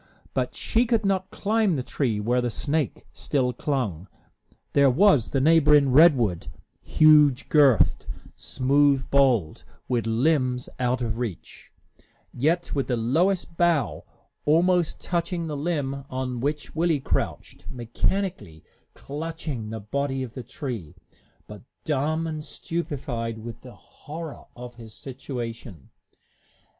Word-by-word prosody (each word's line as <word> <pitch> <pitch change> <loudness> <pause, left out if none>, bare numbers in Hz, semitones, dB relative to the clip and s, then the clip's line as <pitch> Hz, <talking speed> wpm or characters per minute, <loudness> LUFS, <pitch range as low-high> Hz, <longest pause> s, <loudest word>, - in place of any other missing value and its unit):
But - - -2
she 235 +2 +1
could 225 -3 +1
not 190 -1 0
climb 210 -3 +1
the 130 - -2
tree 120 -5 -1
where 120 +4 +1
the 120 - -1
snake 140 +2 -2
still 125 -3 -1
clung. 110 - -2 0.7
There 140 -1 +5
was 145 - +4
the 135 - 0
neighboring 150 -2 +5
redwood, 130 - +4 0.3
huge 150 -4 +4
girthed, 140 - +4 0.3
smooth 135 0 +2
boled, 125 - +2 0.2
with 120 -3 -1
limbs 125 +1 +1
out 125 0 0
of 115 0 -3
reach, 115 -8 -7 0.6
yet 165 +7 0
with 140 -2 -1
the 125 - 0
lowest 165 +10 0
bough 170 -4 +1 0.4
almost 170 +2 +2
touching 170 0 -2
the 155 -2 -4
limb 140 -3 -2
on 130 -1 -3
which 145 +3 -3
Willie 165 -2 +2
crouched, - - -3
mechanically 120 - -3 0.3
clutching 150 -6 -5
the 110 0 -5
body 135 +5 -2
of 120 -3 -8
the 130 - -6
tree, 120 - -6 0.5
but 105 -1 -11 0.2
dumb 155 +2 0
and 155 -2 -4
stupefied 140 -10 -4
with 115 +1 -9
the 125 -1 -12
horror 160 +1 -10
of 125 0 -9
his 115 -2 -10
situation. 120 - -7
140 Hz, 125 wpm, -25 LUFS, 120-160 Hz, 0.7 s, There